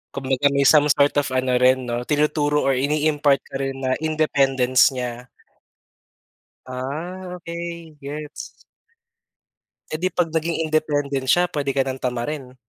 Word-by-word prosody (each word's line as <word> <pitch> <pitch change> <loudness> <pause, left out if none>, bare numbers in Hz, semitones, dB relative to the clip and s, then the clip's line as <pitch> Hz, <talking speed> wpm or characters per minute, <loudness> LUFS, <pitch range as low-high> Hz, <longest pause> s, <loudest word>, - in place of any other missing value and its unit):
Kumbaga 135 +1 +1
may 140 0 +3
some 150 -1 +6
sort 145 0 +3
of - - -4
ano 130 -1 +1
rin 130 -1 +3
'no, 120 +1 -2
tinuturo 150 0 +1
or 135 - +3
ini-impart 145 +1 +2
ka - - -10
rin 135 0 -3
na 130 -1 -1 0.2
independence 135 -5 +3
niya. 125 -1 -6 1.3
Ah, 160 +9 -6
okey. 170 -2 -7
Gets! 150 +1 -8 1.3
Eh, 155 - -3
di 185 - +1
'pag 175 -3 -1
naging 165 +1 -1
independent 145 -3 0
siya, 175 +5 +3
pwede 140 -2 -1
ka 135 - +3
ng 130 0 -5
tamarin? 125 +1 -4
145 Hz, 135 wpm, -22 LUFS, 130-155 Hz, 1.3 s, some